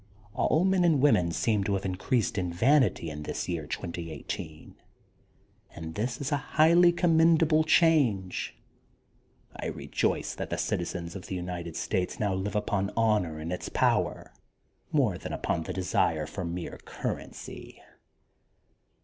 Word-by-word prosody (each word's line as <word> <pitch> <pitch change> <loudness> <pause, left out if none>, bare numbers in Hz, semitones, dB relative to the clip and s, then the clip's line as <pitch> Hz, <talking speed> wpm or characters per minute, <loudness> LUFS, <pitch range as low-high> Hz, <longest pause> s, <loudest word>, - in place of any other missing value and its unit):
All 165 +4 +2
men 190 -1 +3
and 165 -5 +4
women 90 -12 +4
seem 100 +5 +1
to 100 - +1
have 95 0 -3
increased 100 +4 0
in 90 -1 -2
vanity 115 - +2
in 75 0 -6
this 75 - -4
year 85 -4 -3
2018, 80 -3 -6 1.0
and 80 0 -7
this 120 +7 -2
is 140 +1 -3
a 145 - +3
highly 165 +4 +5
commendable 165 -2 +4
change. 140 - +2 1.0
I - - -4
rejoice - - -1
that - - -4
citizens 85 0 -3
of 95 - -8
the 95 - -4
United 90 -2 -5
States 90 -1 -2
now 105 -3 +1
live 95 +3 -3
upon 105 -2 0
honor 105 -8 +2
and 80 +3 -4
its 90 - -5
power - - 0 0.6
more 125 - +2
than - - -6
upon 85 - -1
the - - -4
desire 85 -4 +1
for 90 +5 -6
mere 85 +1 -5
currency. - - -6
95 Hz, 140 wpm, -28 LUFS, 85-145 Hz, 1.0 s, highly